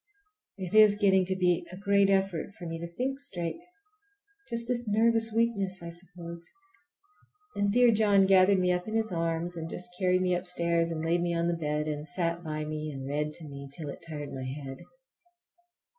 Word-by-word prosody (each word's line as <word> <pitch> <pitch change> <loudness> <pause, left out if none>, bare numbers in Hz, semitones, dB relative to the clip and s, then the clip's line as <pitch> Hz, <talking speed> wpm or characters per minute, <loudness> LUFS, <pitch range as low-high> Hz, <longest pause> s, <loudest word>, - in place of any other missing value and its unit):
It 185 -1 -6
is 215 -1 +7
getting 190 -3 +4
to 190 +1 -1
be 180 -2 +2
a 185 - -8
great 200 0 +3
effort 195 -1 0
for 175 - -9
me 165 0 -4
to 170 - -5
think 260 +10 -3
straight. 175 - -4 0.9
Just 235 -1 -2
this 240 -2 -1
nervous 225 +1 +2
weakness, 200 -5 0
I 170 - -6
suppose. 170 -1 -9 1.1
And 200 0 +1
dear 245 +2 +5
John 205 -3 +4
gathered 190 0 +5
me 180 -1 +2
up 180 +1 -1
in 220 - -3
his 220 -1 0
arms, 165 0 -1
and 165 -1 -5
just 180 +1 -5
carried 185 -1 +2
me 180 -1 +2
upstairs 170 -2 0
and 160 -1 -3
laid 170 +1 +2
me 170 0 0
on 170 0 +1
the 175 - +1
bed, 150 -2 -2
and 150 0 -4
sat 170 +3 -2
by 155 -1 -3
me 155 0 -4
and 135 -1 -6
read 150 +2 -1
to 160 -1 -7
me 140 -1 -9
till 155 -4 -5
it 165 - -8
tired 145 -2 -6
my 130 -1 -5
head. 135 0 -6
180 Hz, 195 wpm, -29 LUFS, 165-200 Hz, 1.1 s, is